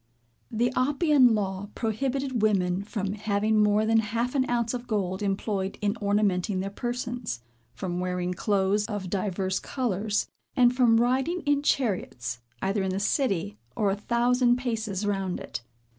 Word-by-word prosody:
The 240 +2 +1
Oppian 270 -2 +4
law 195 -1 -3
prohibited 260 +2 -1
women 190 -4 +2
from 200 -1 -3
having 215 +1 +1
more 210 +1 +3
than 225 0 +4
half 230 +3 -1
an 265 -2 +1
ounce 235 -1 0
of 245 0 -5
gold 190 -4 -1
employed 195 -1 -1
in 205 +1 0
ornamenting 200 -1 +1
their 195 +1 -3
persons, 240 - -4 0.3
from 180 -2 -3
wearing 180 0 -1
clothes 200 +2 +1
of 205 -5 -4
divers 190 -1 -1
colors, 215 -5 -1 0.3
and 250 -2 +5
from 235 -3 +5
riding 265 +9 +1
in 290 -2 +2
chariots, 180 - -1 0.2
either 195 +1 +1
in 190 - -1
the 190 +1 -1
city, 195 - 0 0.2
or 205 -2 +2
a - - 0
thousand 240 +3 +2
paces 220 -5 -2
round 195 -3 -1
it. - - -6
210 Hz, 150 wpm, -27 LUFS, 195-245 Hz, 0.3 s, and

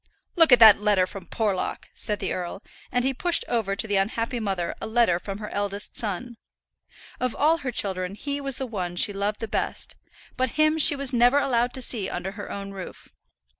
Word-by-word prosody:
"Look 330 -5 +5
at 250 - +9
that 220 -3 +8
letter 205 -3 +3
from 185 -2 -10
Porlock," 205 -2 -3
said 210 -2 -1
the 190 - -2
earl; 180 +1 -5 0.3
and 245 0 0
he 270 - +1
pushed 345 +6 +1
over 220 -5 -1
to 200 - 0
the 205 -1 +1
unhappy 230 +5 -1
mother 190 -5 -2
a - - -4
letter 220 -6 +2
from 195 +2 -6
her 210 0 -7
eldest 205 0 -2
son. 230 +3 0 0.8
Of 255 -1 -1
all 320 +3 +2
her 265 -5 -4
children 190 -3 -2
he 285 +6 -4
was 275 -2 -1
the 265 - -3
one 185 -7 -4
she 205 +3 +1
loved 200 +1 -3
the 225 - -3
best; - - -3 0.4
but 255 -1 -1
him 310 +1 +3
she 300 0 +6
was 275 -2 +2
never 245 +3 +4
allowed 245 -3 +1
to 260 - 0
see 215 -6 -1
under 185 +2 -4
her 205 0 -8
own 200 0 -6
roof. 190 -2 -10
220 Hz, 205 wpm, -25 LUFS, 195-255 Hz, 0.8 s, at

